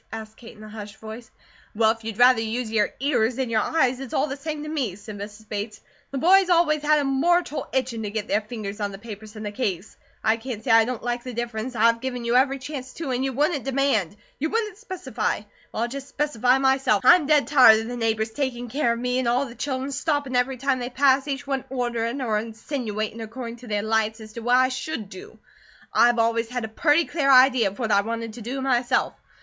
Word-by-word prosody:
asked 220 -1 -8
Kate 230 -1 -13
in 215 - -12
a - - -9
hushed 210 -1 -9
voice. 220 +1 -9 0.5
"Well, 220 0 +4
if 225 0 -7
you'd 220 -2 -5
rather 245 -1 +6
use 225 +1 -3
your 210 -2 +2
ears 255 -4 +1
than 260 -2 -2
your 220 -1 +2
eyes, 260 -4 +1
it's 270 -3 -6
all 270 - +2
the 275 -2 -4
same 300 +1 -5
to - - -7
me," 275 - -2
said 210 +1 -10
Mrs. 210 +1 -9
Bates. 210 +1 -5 0.3
"The 275 - -4
boys 370 +6 +5
always 335 -4 +3
had 300 +1 +3
a 290 - +1
mortal 305 +4 +1
itchin' 250 -3 -1
to 210 - -3
get 215 0 -4
their 210 - +1
fingers 210 -2 -7
on 205 -1 -1
the 195 - -8
papers 215 0 -10
in 215 - -7
the 210 - -4
case. 205 -4 -3 0.3
I 220 +1 +3
can't 225 -2 -6
say - - 0
I 225 0 +6
don't 245 -2 -4
like 240 0 -2
the 250 -2 -7
difference; 235 +1 -4
and 220 - +1
I've 230 0 +4
give 260 -1 -3
you 235 0 -1
every 270 +2 +3
chance, 260 -1 -7
too, 320 -5 -4
an 250 0 -1
you 270 0 0
WOULDN'T 290 +1 0
demand, 260 -9 0 0.2
you 310 +3 -1
WOULDN'T 430 -2 -2
specify. 265 - -3 0.3
Well, 225 - -2
I'll - - 0
just 275 +2 -7
specify 265 -4 +1
myself. 265 -6 +2
I'm 340 -4 +7
dead 300 -1 +4
tired 250 -6 +7
of 225 - -6
the 245 - -5
neighbours 225 -1 -1
taking 245 -2 -3
care 245 -2 +1
of - - -4
me, 250 +1 0
and 255 - -1
all 245 +3 +2
of 275 - -7
the - - -10
children 265 0 -3
stoppin' 285 -1 -1
every 250 +1 +1
time 270 0 0
they 245 0 -4
pass, 270 +1 +3
each 275 -1 -3
one 270 -2 -2
orderin' 240 0 -2
or 215 -3 +1
insinuatin' 225 -1 -4
according 230 +1 -7
to 245 +1 -13
their 210 -1 -1
lights, 220 0 0
as 215 -1 -11
to 235 - -6
what 245 +2 +2
I 255 0 +4
should 255 -5 -5
do. 400 - -11 0.6
I've 240 0 +5
always 230 0 +1
had 245 -2 -3
a - - -8
purty 300 +8 +3
clear 280 -4 +1
idea 255 -3 +6
of 195 - -13
what 225 -4 -2
I 200 0 +5
wanted 230 +1 -4
to 240 - -9
do 255 +5 -4
myself. 250 -2 +1
245 Hz, 240 wpm, -24 LUFS, 220-270 Hz, 0.6 s, I'm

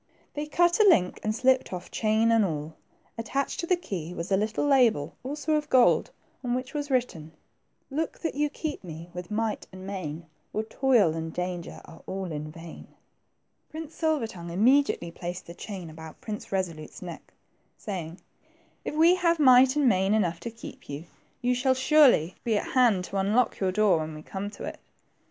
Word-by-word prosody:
They 295 +1 -4
cut 345 +4 +3
a 425 -2 +7
link, 180 - +3
and 215 0 -1
slipped 260 +2 +2
off 180 -1 -6
chain 220 +1 +2
and 225 -1 +4
all. 155 -3 -3 0.5
Attached 270 +5 -2
to 340 - -2
the 365 - +4
key 180 - -6
was 170 +3 -5
a - - +5
little 215 +6 0
label, 240 - +3
also 295 +3 -2
of 300 0 0
gold, 255 -2 +4 0.3
on 245 -1 0
which 255 +2 -4
was 290 -1 -3
written, 175 - -1 0.2
— - - -47
" - - -45
Look 310 +3 -2
that 325 - -2
you 295 +1 0
keep 300 -2 -5
me 170 0 -9
with 180 0 -7
might 215 0 -2
and 185 0 -10
main, 170 -5 -5 0.3
Or 215 - -1
toil 230 -7 +3
and 160 0 -4
danger 180 0 -5
are 165 - -14
all 190 -2 -4
in 150 0 -5
vain." 165 +1 -11 0.8
Prince 315 0 -7
Silver 315 -6 0
tongue 175 -6 -8
immediately 225 -1 +3
placed 175 +1 -6
the 170 - -9
chain 185 -1 -7
about 160 0 -11
Prince 210 -2 -7
Resolute's 175 -5 -3
neck, - - -9 0.5
saying, 180 -5 -6 0.6
If - - -4
we 330 +3 +6
have 340 -2 +2
might 260 -2 +6
and 290 -3 +3
main 195 -1 +3
enough 175 -6 0
to 235 - -5
keep 230 0 -11
you, 145 +3 -6 0.4
you 250 +1 +3
shall 260 +1 +2
surely 260 - +5
be 225 -3 +1
at - - -3
hand 235 -8 +4
to 195 - -5
unlock 215 +5 +2
your 190 -2 +1
door 195 -3 +3
when 155 0 -5
we 155 - -10
come 195 +4 -5
to - - -10
it." - - -6
215 Hz, 190 wpm, -27 LUFS, 175-265 Hz, 0.8 s, a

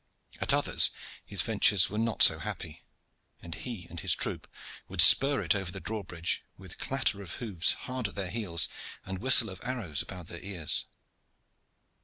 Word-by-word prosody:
At - - 0
others - - +3 0.3
his - - -2
ventures 95 -3 +2
were 105 - -4
not 115 -2 0
so 80 - +6
happy, 75 0 -9 0.6
and 85 - -10
he 100 +2 -9
and 85 - -9
his - - 0
troop - - -3 0.4
would - - -11
spur 140 -3 +8
it 85 - +1
over 95 -3 -5
the 95 - -8
drawbridge 90 -5 -4
with - - -9
clatter 130 -7 -2
of 90 -4 -9
hoofs 100 -8 0
hard 130 -4 -4
at 95 - -13
their 95 -3 -5
heels 95 -7 +1 0.4
and 95 -1 -7
whistle 120 -2 +6
of 95 - -12
arrows 115 - -4
about 90 -3 -10
their 85 0 -8
ears. 90 -6 -2
95 Hz, 170 wpm, -27 LUFS, 85-115 Hz, 0.6 s, spur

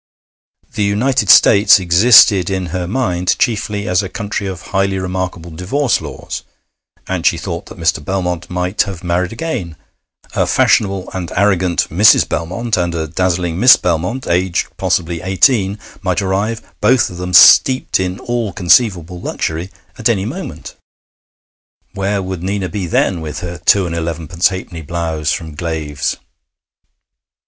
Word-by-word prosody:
The 105 - -1
United 125 +7 0
States 100 0 +6
existed 95 +1 +5
in 95 -1 -2
her 90 -2 -3
mind 90 -5 -1
chiefly 105 -3 -1
as 90 +1 +2
a 95 - -6
country 105 -1 -4
of 90 -3 -7
highly 95 0 +1
remarkable 90 -2 -4
divorce 115 - -1
laws, - - -7 0.7
and 95 -3 -3
she 85 - +2
thought 85 0 -6
that - - -12
Mr. 85 -3 0
Belmont 90 0 -3
might 90 +2 -1
have 95 -2 -4
married 90 +1 -1
again. 115 - -5 0.6
A - - 0
fashionable 95 -3 +1
and 90 -2 -5
arrogant 95 -4 +1
Mrs. 105 +6 +5
Belmont, 95 +8 -2
and 85 -1 -1
a 80 -1 -3
dazzling 90 +1 -1
Miss 125 +4 +8
Belmont, 90 +9 -2
aged 90 +1 -1
possibly 85 -1 -1
eighteen, 95 +1 +2 0.2
might 95 -2 -1
arrive, 100 +3 -2 0.2
both 130 -5 +3
of 90 - -9
them 90 0 -5
steeped 130 +8 +6
in 95 0 -3
all 120 -4 -2
conceivable 90 -3 +1
luxury, 80 +4 -4 0.3
at 115 - +1
any 100 -4 0
moment. 175 - -7 1.2
Where 100 0 -2
would 95 -2 -5
Nina 95 0 -3
be 95 +1 -4
then, 85 +1 0
with 75 -1 -6
her 90 -2 -6
two 100 -2 +3
and 85 - -4
eleven 85 -1 -4
pence 85 +1 +2
halfpenny 95 -3 -6
blouse 80 -1 -3
from 80 -2 -4
Glave's?... 75 -3 -3
95 Hz, 150 wpm, -16 LUFS, 85-100 Hz, 1.2 s, Miss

